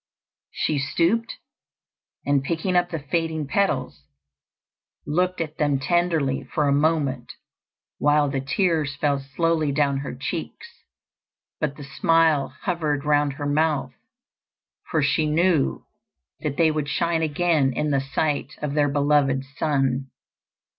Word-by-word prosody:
She 150 -2 -1
stooped, 170 +11 0 0.9
and 140 -1 +2
picking 170 +5 -1
up 175 0 +3
the 165 - -3
fading 160 +1 -2
petals, 135 - -1 1.0
looked 180 +5 0
at 155 -2 -4
them 145 -2 +2
tenderly 160 -3 +1
for 150 -2 -1
a 140 - +3
moment, 150 -2 0 0.7
while 145 0 +3
the 135 -1 -1
tears 155 0 0
fell 145 -1 0
slowly 155 +3 0
down 140 -1 +1
her 140 +1 -5
cheeks; - - -5 0.9
but 150 -2 -1
the 145 - -8
smile 160 0 +2 0.2
hovered 155 -5 -1
round 145 -1 +2
her 145 +1 -6
mouth; 150 0 0 1.0
for 155 - +1
she 155 +2 +2
knew 165 -1 +1 0.5
that 150 -3 -3
they 160 -2 +4
would 150 -1 -2
shine 165 +2 0
again 155 -3 +2
in 150 +3 -1
the 135 -1 +2
sight 140 +1 -2
of 150 -2 -3
their 145 -1 +2
beloved 140 -1 +2
sun. 135 -3 0
150 Hz, 130 wpm, -24 LUFS, 140-165 Hz, 1.0 s, they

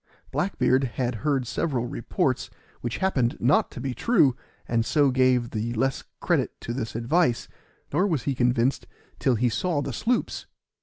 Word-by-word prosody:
Black 190 +2 -1
beard 130 +2 +3
had 125 -1 0
heard 140 -4 +1
several 125 -1 -1
reports, - - -1 0.3
which 120 -1 -3
happened 135 -11 +1
not 130 +5 +3
to - - -9
be 135 -2 -3
true, 160 - +3 0.3
and 115 -1 +1
so 145 +2 +3
gave 130 -2 +2
the 115 +2 -2
less 135 +3 0 0.2
credit - - 0
to 120 - -4
this 115 -4 -4
advice; 120 +2 +1 0.5
nor 190 - +3
was 155 - 0
he 140 - 0
convinced 125 +1 +1 0.3
till 130 -3 +2
he 120 +3 +2
saw 155 +7 0
the 140 - -4
sloops. 235 - -1
130 Hz, 165 wpm, -26 LUFS, 120-150 Hz, 0.5 s, beard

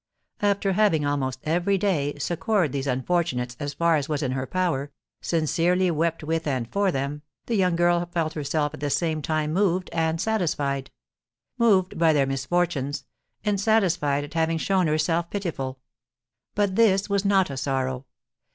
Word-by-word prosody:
After 200 -1 +1
having, 185 -7 +2
almost 130 -3 -1
every 175 +5 +1
day, 170 -8 0
succoured 175 - 0
these 140 0 -3
unfortunates 130 -2 -1
as 145 -1 -4
far 170 -1 +3
as 145 +1 -3
was 150 -1 -1
in 130 - -1
her 130 0 -3
power, 165 -7 -1 0.3
sincerely 170 +3 +1
wept 165 0 -1
with 160 +1 -1
and 130 -5 -1
for 200 - +1
them, 140 +1 -3 0.2
the 235 - -3
young 180 -4 +2
girl 175 0 +2
felt 160 -2 -1
herself 150 0 -1
at 155 - -8
the 145 - -2
same 160 +1 0
time 155 0 -1
moved 185 -1 +1
and 165 0 0
satisfied, 150 -10 -1 0.7
moved 195 -7 +3
by 165 -1 +5
their 140 -2 +3
misfortunes, 140 0 -1 0.4
and 205 -2 +1
satisfied 180 -10 +2
at 145 - -9
having 165 0 +1
shown 185 +1 +1
herself 165 +2 0
pitiful. 150 -10 -4 0.8
But 200 -2 +1
this 200 -3 +4
was 200 -1 0
not 195 -5 +3
a - - -5
sorrow. 130 -1 -2
165 Hz, 160 wpm, -25 LUFS, 145-185 Hz, 0.8 s, by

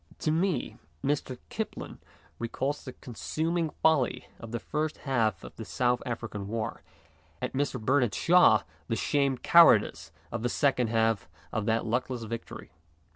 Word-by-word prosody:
To 155 - +1
me, 175 +2 0 0.2
Mr. 135 -3 -1
Kipling 220 0 -5 0.4
recalls 130 +5 -2
the 130 - -7
consuming 160 +8 -2
folly 155 -5 +1
of 115 -1 -9
the 120 - -1
first 150 +7 -2
half 115 -9 +1
of 60 - -10
the - - -5
South 125 -1 0
African 115 -4 -4
war, 110 +1 -3 0.6
and - - -3
Mr. 135 -1 -1
Bernard 125 -1 +2
Shaw 175 -11 +5 0.2
the 115 - 0
shamed 135 - 0
cowardice 170 - +6 0.2
of 120 - -3
the 120 - 0
second 125 -2 +2
half 115 -4 +1 0.2
of 110 -2 -2
that 115 0 +1
luckless 125 +1 -1
victory. 115 +1 -7
125 Hz, 145 wpm, -29 LUFS, 115-145 Hz, 0.6 s, cowardice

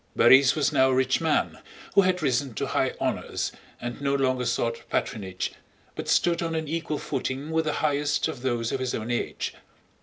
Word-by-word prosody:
Borís 135 0 +7
was 150 -4 +1
now 130 0 +5
a 130 - +2
rich 130 +3 +2
man 160 -2 0 0.3
who 200 - +7
had 185 -2 +1
risen 130 -2 0
to - - -1
high - - 0
honors - - -2 0.3
and 120 +3 -6
no 140 0 +1
longer 130 -2 +1
sought 115 0 -2
patronage 95 -6 -2 0.4
but - - -5
stood 170 -1 +3
on 165 -1 -2
an 160 -1 -2
equal 160 -1 -2
footing 140 +2 -3
with 160 0 +1
the 150 - 0
highest 145 0 +1
of 145 -6 -6
those 120 -3 -1
of 135 - -1
his 130 -1 -2
own 110 +2 -4
age. 120 - -2
135 Hz, 190 wpm, -26 LUFS, 125-155 Hz, 0.4 s, Borís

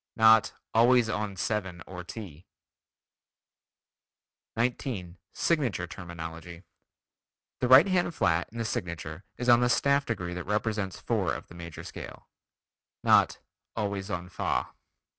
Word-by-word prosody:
Not 110 -1 +6 0.2
"always 120 0 +5
on 105 -2 -2
7 95 -5 -2
or 90 -1 -8
ti." 90 -4 -9 2.1
19. 115 -7 -2
Signature 130 - 0
Terminology: 85 0 -8 1.0
The 125 - +1
right 130 +7 +8
hand 175 -3 +1
flat 85 0 +1
in 115 - -10
the 115 - -2
signature 85 -3 -4
is 125 - -4
on 120 -1 +7
the 120 0 +2
staff 140 +2 +2
degree 90 -7 -3
that 90 -1 -5
represents 105 -2 -1
four - - 0
of - - -9
the - - -12
major 85 -2 -8
scale. - - -9 0.8
Not - - +5 0.4
"always 100 -2 -2
on 90 -2 -3
fa." - - -1
100 Hz, 125 wpm, -28 LUFS, 85-120 Hz, 2.1 s, right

